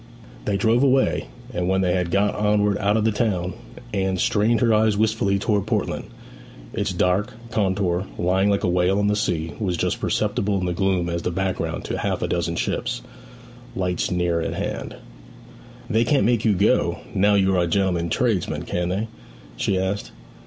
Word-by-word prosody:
They 100 Hz, -2 st, +1 dB
drove 115 Hz, +4 st, +3 dB
away; 135 Hz, -1 st, +2 dB, 0.3 s
and 90 Hz, -2 st, -1 dB
when 95 Hz, 0 st, +2 dB
they 90 Hz, -2 st, +2 dB
had 90 Hz, -2 st, 0 dB
got 100 Hz, +4 st, +2 dB
onward 105 Hz, -1 st, +1 dB
out 105 Hz, +2 st, +2 dB
of 110 Hz, -, +1 dB
the 110 Hz, -, +3 dB
town, 95 Hz, -5 st, -1 dB, 0.4 s
Anne 95 Hz, -1 st, 0 dB
strained 110 Hz, +5 st, +2 dB
her 115 Hz, -2 st, +4 dB
eyes 110 Hz, -1 st, +3 dB
wistfully 110 Hz, -2 st, +1 dB
towards 105 Hz, 0 st, 0 dB
Portland. -, -, -1 dB, 0.7 s
Its 100 Hz, -1 st, -1 dB
dark 90 Hz, +4 st, +1 dB, 0.2 s
contour, 95 Hz, -3 st, 0 dB
lying 95 Hz, +3 st, +2 dB
like 100 Hz, -1 st, +1 dB
a -, -, +2 dB
whale 90 Hz, +2 st, +2 dB
on 105 Hz, -, +1 dB
the 105 Hz, 0 st, +2 dB
sea, 80 Hz, -6 st, -1 dB
was 90 Hz, -5 st, -1 dB
just -, -, -1 dB
perceptible 105 Hz, -1 st, 0 dB
in 90 Hz, -, -2 dB
the 90 Hz, -, -1 dB
gloom 95 Hz, -1 st, +1 dB
as 85 Hz, 0 st, -2 dB
the -, -, -1 dB
background 95 Hz, +1 st, -2 dB
to -, -, -3 dB
half -, -, -1 dB
a -, -, 0 dB
dozen -, -, -1 dB
ships' -, -, -2 dB, 0.7 s
lights 90 Hz, -2 st, -1 dB
nearer 90 Hz, -2 st, 0 dB
at -, -, -3 dB
hand. -, -, -4 dB, 0.9 s
'They 110 Hz, +2 st, +2 dB
can't 135 Hz, -4 st, +3 dB
make 120 Hz, -1 st, +2 dB
you 105 Hz, -3 st, +4 dB
go, 100 Hz, +4 st, +2 dB
now 100 Hz, +2 st, +3 dB
you 95 Hz, -1 st, +3 dB
are 90 Hz, -, +3 dB
a 85 Hz, -, +1 dB
gentleman 90 Hz, -2 st, +1 dB
tradesman, 110 Hz, -1 st, 0 dB
can 90 Hz, 0 st, -2 dB
they?' 100 Hz, +5 st, -1 dB, 0.5 s
she 95 Hz, -, 0 dB
asked. 95 Hz, +2 st, -2 dB
100 Hz, 185 wpm, -23 LUFS, 90-105 Hz, 0.9 s, her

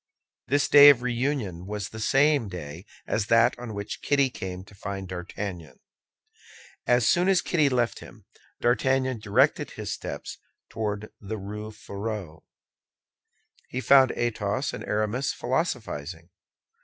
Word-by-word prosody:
This 145 Hz, 0 st, +2 dB
day 145 Hz, 0 st, +10 dB
of 130 Hz, -4 st, +4 dB
reunion 120 Hz, -, -2 dB
was 105 Hz, 0 st, -4 dB
the 110 Hz, -, -9 dB
same 135 Hz, +1 st, +3 dB
day 85 Hz, 0 st, -8 dB, 0.2 s
as 105 Hz, -1 st, -1 dB
that 115 Hz, +2 st, +5 dB
on 120 Hz, -3 st, -7 dB
which 100 Hz, 0 st, -6 dB
Kitty 140 Hz, -2 st, +2 dB
came 95 Hz, -4 st, -6 dB
to 100 Hz, -, -17 dB
find 100 Hz, -1 st, -6 dB
D'Artagnan. 90 Hz, -4 st, -6 dB, 1.2 s
Soon 175 Hz, -, +3 dB
as 190 Hz, -2 st, +3 dB
Kitty 155 Hz, -5 st, +2 dB
left 120 Hz, -3 st, 0 dB
him, -, -, -14 dB, 0.4 s
D'Artagnan 130 Hz, 0 st, +1 dB
directed 100 Hz, -1 st, +2 dB
his -, -, -5 dB
steps -, -, -7 dB, 0.3 s
toward 105 Hz, -1 st, -4 dB
the 110 Hz, +2 st, -5 dB
Rue 105 Hz, +2 st, -6 dB
Férou. 100 Hz, -5 st, -6 dB, 1.3 s
He 125 Hz, -, -3 dB
found 130 Hz, -1 st, +6 dB
Athos 120 Hz, +2 st, -1 dB
and -, -, -6 dB
Aramis 110 Hz, +6 st, -1 dB
philosophizing. 100 Hz, -, -3 dB
110 Hz, 130 wpm, -26 LUFS, 100-130 Hz, 1.3 s, day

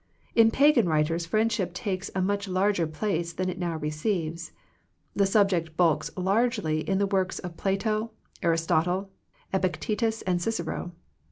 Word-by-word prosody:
In 225 Hz, -1 st, +6 dB
Pagan 260 Hz, -, +4 dB
writers 165 Hz, +2 st, +1 dB
friendship 210 Hz, -2 st, 0 dB
takes 190 Hz, 0 st, -3 dB
a 190 Hz, -, +1 dB
much 200 Hz, +1 st, -1 dB
larger 185 Hz, -2 st, +1 dB
place 170 Hz, 0 st, -2 dB
than 185 Hz, 0 st, -2 dB
it 180 Hz, -, -8 dB
now 170 Hz, -3 st, -2 dB
receives. 160 Hz, +2 st, -2 dB, 0.6 s
The 200 Hz, -1 st, +3 dB
subject 185 Hz, -6 st, +2 dB
bulks 160 Hz, -4 st, +2 dB
largely 195 Hz, -4 st, +1 dB
in 190 Hz, -, +2 dB
the 200 Hz, -, +2 dB
works 190 Hz, -1 st, 0 dB
of 180 Hz, -2 st, -7 dB
Plato, 215 Hz, +4 st, -1 dB, 0.3 s
Aristotle, 170 Hz, +3 st, +1 dB, 0.4 s
Epictetus, 215 Hz, +4 st, 0 dB, 0.2 s
Cicero. 175 Hz, -3 st, -3 dB
185 Hz, 135 wpm, -27 LUFS, 170-205 Hz, 0.6 s, In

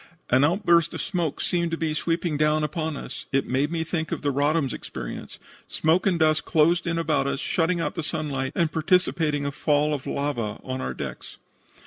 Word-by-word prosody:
An 130 Hz, +2 st, +5 dB
outburst 170 Hz, 0 st, +3 dB
of -, -, -3 dB
smoke 175 Hz, -6 st, -2 dB
seemed 170 Hz, -1 st, 0 dB
to 165 Hz, -, -2 dB
be 160 Hz, -2 st, -1 dB
sweeping 165 Hz, 0 st, -1 dB
down 150 Hz, +1 st, +2 dB
upon 155 Hz, -1 st, -2 dB
us. 135 Hz, -, -8 dB
It 135 Hz, 0 st, +2 dB
made 140 Hz, +4 st, 0 dB
me 165 Hz, -1 st, -1 dB
think 160 Hz, -1 st, -3 dB
of -, -, -3 dB
the 145 Hz, -, +2 dB
Roddam's 145 Hz, 0 st, +1 dB
experience. -, -, -7 dB, 0.3 s
Smoke 165 Hz, +5 st, +2 dB
and 180 Hz, -3 st, +2 dB
dust 155 Hz, -1 st, +3 dB
closed 170 Hz, +2 st, +3 dB
in 170 Hz, 0 st, 0 dB
about 155 Hz, -4 st, +1 dB
us, 140 Hz, -, -1 dB
shutting 170 Hz, +3 st, +1 dB
out 150 Hz, -3 st, -1 dB
the 175 Hz, -, -3 dB
sunlight, 145 Hz, -4 st, -2 dB
and 165 Hz, -2 st, +1 dB
precipitating 160 Hz, -3 st, +1 dB
a 140 Hz, -, -1 dB
fall 150 Hz, +1 st, +1 dB
of 140 Hz, -3 st, -4 dB
lava 120 Hz, -7 st, -2 dB
on 130 Hz, 0 st, -4 dB
our -, -, -3 dB
decks. -, -, -7 dB
155 Hz, 195 wpm, -25 LUFS, 145-170 Hz, 0.3 s, An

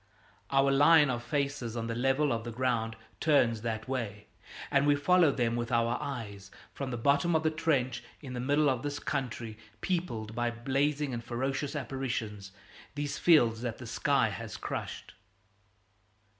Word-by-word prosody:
Our 135 Hz, 0 st, +3 dB
line 145 Hz, +1 st, +6 dB
of 120 Hz, -1 st, -2 dB
faces 135 Hz, -2 st, -2 dB
on 115 Hz, -, -2 dB
the 115 Hz, -, -2 dB
level 135 Hz, +4 st, +2 dB
of 115 Hz, -1 st, -3 dB
the 120 Hz, -, -5 dB
ground 115 Hz, -2 st, -1 dB, 0.2 s
turns 120 Hz, -8 st, +3 dB
that 110 Hz, 0 st, -3 dB
way, 110 Hz, -6 st, -4 dB, 0.5 s
and 140 Hz, +1 st, +3 dB
we 145 Hz, -, +5 dB
follow 165 Hz, +2 st, +4 dB
them 120 Hz, -3 st, 0 dB
with 120 Hz, 0 st, -3 dB
our 115 Hz, 0 st, +2 dB
eyes 100 Hz, -8 st, -6 dB, 0.2 s
from 140 Hz, -2 st, -4 dB
the 120 Hz, -, -3 dB
bottom 140 Hz, +7 st, +2 dB
of 160 Hz, -, +2 dB
the 155 Hz, -, +2 dB
trench 130 Hz, -6 st, 0 dB, 0.2 s
in 135 Hz, -4 st, -8 dB
the 125 Hz, -, -4 dB
middle 145 Hz, +4 st, +2 dB
of 130 Hz, -3 st, +1 dB
this 145 Hz, 0 st, -3 dB
country 120 Hz, -7 st, -4 dB, 0.2 s
peopled 120 Hz, -, -2 dB
by 120 Hz, +1 st, 0 dB
blazing 135 Hz, +4 st, -1 dB
and 115 Hz, -1 st, -4 dB
ferocious 135 Hz, +4 st, -2 dB
apparitions, 115 Hz, -8 st, -4 dB, 0.4 s
these 145 Hz, 0 st, -3 dB
fields 120 Hz, -10 st, +4 dB
that 120 Hz, -2 st, -3 dB
the 125 Hz, -, -9 dB
sky -, -, +1 dB
has -, -, -6 dB
crushed. -, -, -5 dB
130 Hz, 165 wpm, -30 LUFS, 115-145 Hz, 0.5 s, line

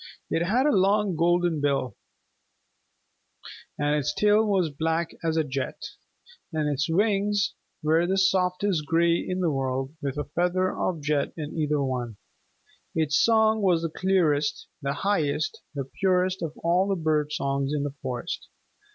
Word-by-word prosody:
It 165 Hz, -, +1 dB
had 245 Hz, +7 st, +2 dB
a 295 Hz, -, +4 dB
long 200 Hz, 0 st, +2 dB
golden 175 Hz, -1 st, +2 dB
bill, 140 Hz, -3 st, 0 dB, 1.8 s
and 145 Hz, 0 st, +1 dB
its 150 Hz, 0 st, 0 dB
tail 210 Hz, +1 st, +4 dB
was 190 Hz, -7 st, +1 dB
black 160 Hz, +3 st, -1 dB
as 165 Hz, -1 st, 0 dB
jet; 135 Hz, 0 st, -3 dB, 0.7 s
and 155 Hz, -2 st, -1 dB
its 145 Hz, 0 st, -1 dB
wings 205 Hz, +2 st, +1 dB, 0.3 s
were 160 Hz, +3 st, +3 dB
the 190 Hz, +1 st, +1 dB
softest 185 Hz, -3 st, +1 dB
gray 170 Hz, +1 st, +3 dB
in 185 Hz, +1 st, -3 dB
the 170 Hz, -3 st, +2 dB
world 135 Hz, 0 st, -2 dB
with 140 Hz, 0 st, -3 dB
a 145 Hz, -, -1 dB
feather 180 Hz, +4 st, 0 dB
of 165 Hz, -5 st, -2 dB
jet 145 Hz, -1 st, 0 dB
in 150 Hz, -1 st, -5 dB
either 150 Hz, -2 st, 0 dB
one. 125 Hz, -5 st, -3 dB, 0.8 s
Its 155 Hz, -2 st, +2 dB
song 220 Hz, -1 st, +4 dB
was 175 Hz, -4 st, +2 dB
the 165 Hz, -, -1 dB
clearest, 160 Hz, -6 st, +1 dB
the 140 Hz, 0 st, -1 dB
highest, 155 Hz, -6 st, 0 dB
the 140 Hz, -2 st, -3 dB
purest 185 Hz, -1 st, +2 dB
of 160 Hz, -2 st, -4 dB
all 175 Hz, +3 st, +3 dB
the 195 Hz, -, +1 dB
bird 155 Hz, -3 st, 0 dB
songs 140 Hz, -1 st, -1 dB
in 150 Hz, -1 st, -1 dB
the 145 Hz, -1 st, -3 dB
forest. 130 Hz, +5 st, -4 dB
165 Hz, 150 wpm, -26 LUFS, 145-185 Hz, 1.8 s, a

